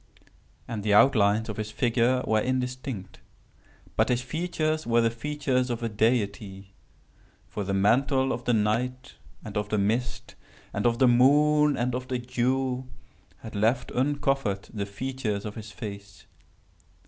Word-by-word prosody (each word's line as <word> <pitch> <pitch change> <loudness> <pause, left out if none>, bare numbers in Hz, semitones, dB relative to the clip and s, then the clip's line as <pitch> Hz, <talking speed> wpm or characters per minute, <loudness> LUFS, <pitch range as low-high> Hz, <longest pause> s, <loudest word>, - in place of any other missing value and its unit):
And 110 -3 -4
the 105 -1 +3
outlines 110 -3 +4
of 110 - -5
his 110 -1 -3
figure 120 +2 +1
were 110 0 +2
indistinct—but 125 -5 -5
his 125 0 +1
features 155 +1 -2
were 120 0 +3
the 115 0 +2
features 130 0 -1
of 120 -1 -3
a 115 - -1
deity; 100 -3 -1 0.7
for 105 - -4
the 100 0 -2
mantle 130 +7 +2
of 120 - -6
the 120 - +2
night, 125 +5 -1 0.3
and 105 - -8
of 105 0 -2
the 105 - 0
mist, 110 +5 -1 0.4
and 105 +3 +1
of 115 0 +1
the 130 0 +5
moon, 145 +4 +4
and 120 +1 0
of 130 +1 -4
the 130 - -1
dew, 125 +1 -1 0.5
had 110 - -9
left 115 +4 +1
uncovered 135 -6 0
the 100 -2 -3
features 110 -1 -3
of 105 - -5
his 110 -1 -8
face. 100 0 -9
120 Hz, 150 wpm, -27 LUFS, 105-130 Hz, 0.7 s, the